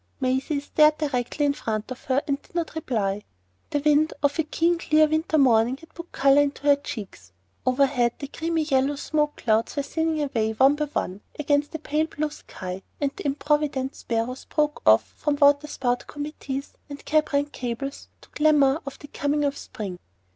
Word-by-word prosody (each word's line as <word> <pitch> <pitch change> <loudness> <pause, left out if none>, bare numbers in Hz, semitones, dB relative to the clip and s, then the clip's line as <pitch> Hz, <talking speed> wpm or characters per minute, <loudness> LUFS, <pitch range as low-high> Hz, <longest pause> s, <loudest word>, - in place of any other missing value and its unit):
Maisie 265 +2 0
stared 305 +1 +4
directly 290 -1 -1
in 285 - +2
front 220 -3 -4
of 255 - -8
her 265 +2 +1
and 280 -1 -1
did - - -25
not 340 -2 -2
reply. 210 -10 -1 0.5
The 290 - -1
wind 300 +2 +3
of 285 +2 +1
a - - +4
keen 335 +3 +1
clear 310 -1 +4
winter 315 +1 0
morning 245 -2 +4
had 325 +2 -17
put 340 0 -10
colour 275 +1 +5
into 285 -1 -2
her 285 -1 +6
cheeks. 210 - -8 0.3
Overhead, 255 -2 +3
the 280 - -6
creamy 325 +2 -1
yellow 275 -1 +1
smoke 300 +1 -1
clouds 220 0 0
were 285 - 0
thinning 320 +1 -1
away 225 -6 0
one 265 +5 +5
by 300 0 -1
one 200 -9 -3 0.2
against 290 +1 0
a - - 0
pale 310 0 -1
blue 305 -1 -3
sky, 185 -8 -7 0.2
and 280 -1 0
the - - -4
improvident 285 -1 0
sparrows 235 +3 -3
broke 300 -1 0
off 110 +1 +7
from 295 -1 -2
water 285 +1 +4
spout 245 -4 -2
committees 290 -2 -5 0.2
and 285 0 -9
cab 310 0 +2
rank 285 0 +1
cabals 255 +3 -5
to - - -18
clamour 295 -1 +3
of 275 - -6
the 290 - -12
coming 290 +1 -1
of 280 0 0
spring. 190 -5 -7
285 Hz, 185 wpm, -25 LUFS, 255-300 Hz, 0.5 s, off